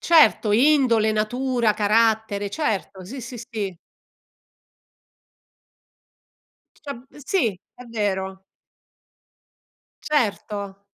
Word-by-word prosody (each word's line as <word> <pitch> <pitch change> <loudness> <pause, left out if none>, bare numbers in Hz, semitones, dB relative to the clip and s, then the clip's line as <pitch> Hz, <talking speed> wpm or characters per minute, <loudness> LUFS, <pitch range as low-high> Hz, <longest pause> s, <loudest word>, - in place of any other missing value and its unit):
Certo, 300 -10 +5
indole, 240 -4 +4
natura, 235 +1 +1
carattere. 215 -1 +2
Certo. 200 - -2
Sì, 255 +7 -7
sì, 240 +1 -8
sì. 215 -6 -5 3.0
Diciam 270 -3 -9 0.2
Sì, 230 - 0 0.2
è 250 - -12
vero. 190 -4 -3 1.6
Certo. 205 -7 -2
220 Hz, 70 wpm, -23 LUFS, 205-250 Hz, 3.0 s, Certo